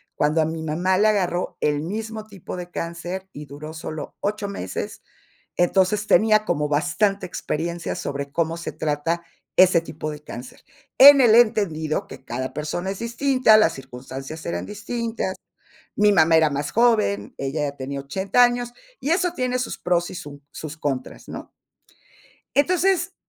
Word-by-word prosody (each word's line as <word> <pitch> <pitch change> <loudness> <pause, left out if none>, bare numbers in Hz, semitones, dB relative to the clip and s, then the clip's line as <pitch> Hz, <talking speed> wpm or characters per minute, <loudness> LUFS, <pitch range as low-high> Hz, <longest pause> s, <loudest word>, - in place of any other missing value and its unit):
cuando 150 +2 +2
a - - +2
mi 160 0 -4
mamá 175 +4 +1
le 215 +2 +4
agarró 180 -3 -1
el 150 0 +1
mismo 220 +4 -5
tipo 195 -4 -8
de 175 0 -7
cáncer, 175 +3 -5
y 150 +1 -8
duró 145 +3 -9
solo 155 -2 -6
8 205 0 -2
meses. 145 - -5 0.5
Entonces 190 +4 +2
tenía 215 0 +4
como 150 -6 0
bastante 175 +7 +1
experiencia 170 0 -3
sobre 140 0 -4
cómo 165 +1 0
se 170 - -5
trata 155 +3 -2 0.3
ese 180 -2 +6
tipo 155 -2 -6
de 150 0 -9
cáncer. 125 -3 -10 0.4
En 280 +1 +11
el 235 -4 +6
entendido 200 -10 +2
que - - -11
cada 130 +1 -4
persona 175 +5 -3
es 195 - -7
distinta, 235 -1 +4
las 215 - +4
circunstancias 135 +3 -8
eran 170 - -3
distintas. 220 -1 -3 0.6
Mi 210 0 +4
mamá 160 -3 +5
era 160 -1 +5
más 140 +1 -2
joven, 215 - +2
ella 140 +3 -2
ya 140 - -18
tenía 140 +1 -5
80 190 - +1
años, 245 0 +2 0.3
y 285 - -2
eso 355 0 +1
tiene 255 0 -1
sus 250 - -3
pros, 175 -1 0
y - - -8
su 145 -4 -9
sus 155 -1 -7
contras 135 -4 -4
¿no? - - -8 1.1
Entonces 360 +4 +2
175 Hz, 160 wpm, -23 LUFS, 150-215 Hz, 1.1 s, En